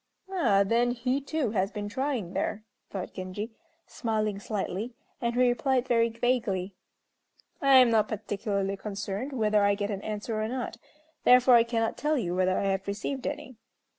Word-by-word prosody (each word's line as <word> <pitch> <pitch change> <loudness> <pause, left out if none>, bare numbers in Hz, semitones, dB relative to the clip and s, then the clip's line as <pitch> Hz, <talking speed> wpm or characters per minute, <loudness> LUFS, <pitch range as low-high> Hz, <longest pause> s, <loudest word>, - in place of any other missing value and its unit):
"Ah, 235 - +3
then, 235 +4 +2
he 250 +3 -1
too 280 -4 -1
has 195 -2 +1
been 205 -1 -4
trying 250 -6 -2
there," 215 +2 -2 0.3
thought 190 -2 -5
Genji, 185 +4 -5 0.3
smiling 215 -3 -2
slightly, 210 +3 -3 0.3
and 235 -1 -1
he 250 0 +4
replied 255 +1 +1
very 230 -2 +3
vaguely, 225 -5 -1 0.9
"I 275 -2 +6
am 250 -2 +7
not 215 -2 +3
particularly 200 -2 -2
concerned 205 +5 -4
whether 215 -5 +2
I 200 0 +4
get 205 +1 -2
an 195 -1 -4
answer 215 +1 -3
or 215 - -1
not, 245 -1 -4 0.5
therefore 250 0 +7
I 235 -1 +8
cannot 230 -1 -1
tell 300 0 +1
you 180 -8 -1
whether 185 0 +2
I - - 0
have 195 +1 -2
received 220 +6 -3
any." 255 -5 -6
225 Hz, 165 wpm, -28 LUFS, 200-250 Hz, 0.9 s, I